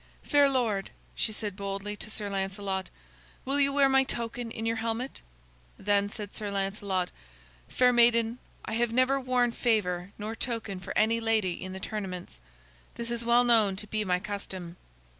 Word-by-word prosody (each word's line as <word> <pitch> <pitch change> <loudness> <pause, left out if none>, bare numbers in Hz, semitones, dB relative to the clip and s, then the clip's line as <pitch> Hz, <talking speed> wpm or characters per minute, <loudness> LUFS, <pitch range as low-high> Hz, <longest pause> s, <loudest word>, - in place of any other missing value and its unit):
"Fair 285 -2 +4
lord," 230 -7 0 0.2
she 220 - 0
said 210 -2 -3
boldly 200 +1 -4
to 210 - -4
Sir 210 -1 -1
Lancelot, 195 -1 -2 0.6
"will 275 +2 +2
you 280 -1 +5
wear 280 0 +5
my 270 0 +5
token 235 -2 -3
in 225 0 -5
your 225 0 0
helmet?" 230 +3 -3 0.6
Then 205 0 +2
said 205 -1 -6
Sir 210 -1 -4
Lancelot: 195 -2 -1 0.6
"Fair 250 0 +4
maiden, 235 0 +4 0.3
I - - -4
have 235 0 +1
never 255 +3 +3
worn 250 -2 +2
favor 195 -6 0
nor 215 +2 -4
token 225 -6 -3
for 185 - -7
any 225 +2 +3
lady 220 -5 +1
in 185 +2 -7
the 190 - -6
tournaments. 185 - -5 0.5
This 235 0 -4
is 235 0 -2
well 235 +1 +5
known 220 -5 +4
to 205 - -5
be 215 0 -1
my 180 -2 +1
custom." 190 -4 -5
215 Hz, 170 wpm, -29 LUFS, 195-235 Hz, 0.6 s, you